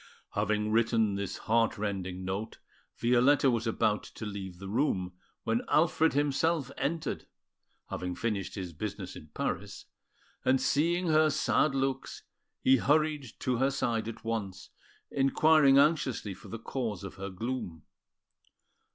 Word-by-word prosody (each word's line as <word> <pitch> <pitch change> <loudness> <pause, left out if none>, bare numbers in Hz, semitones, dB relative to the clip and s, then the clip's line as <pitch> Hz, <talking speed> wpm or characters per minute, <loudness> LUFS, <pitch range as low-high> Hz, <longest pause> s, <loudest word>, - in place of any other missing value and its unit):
Having 105 +1 0
written 110 -2 +2
this 100 -1 -3
heart 115 0 +1
rending 95 -3 -3
note, 95 +4 -4 0.4
Violetta 125 +3 +4
was 115 -1 -1
about 105 -1 +1
to 110 - -9
leave 95 -3 -6
the 95 +1 -8
room, 95 -5 0 0.3
when 115 0 +1
Alfred 160 0 +3
himself 145 0 +1
entered, 155 +4 -2 0.6
having 90 0 -3
finished 105 -6 -2
his 90 -4 -5
business 100 +2 -5
in 75 - -10
Paris; - - -3 0.6
and 130 0 +3
seeing 165 +6 +1
her 155 0 +5
sad 150 0 +2
looks, 135 0 -2 0.4
he 130 0 +6
hurried 150 +1 +2
to 125 -2 0
her 135 +3 +3
side 115 -5 -1
at 115 - -7
once, 100 -4 -4 0.4
inquiring 140 +1 +5
anxiously 140 -8 +2
for 95 - -14
the 115 - -6
cause 115 -4 -4
of 95 - -6
her 95 +1 -5
gloom. 95 - -5
115 Hz, 135 wpm, -30 LUFS, 100-140 Hz, 0.6 s, he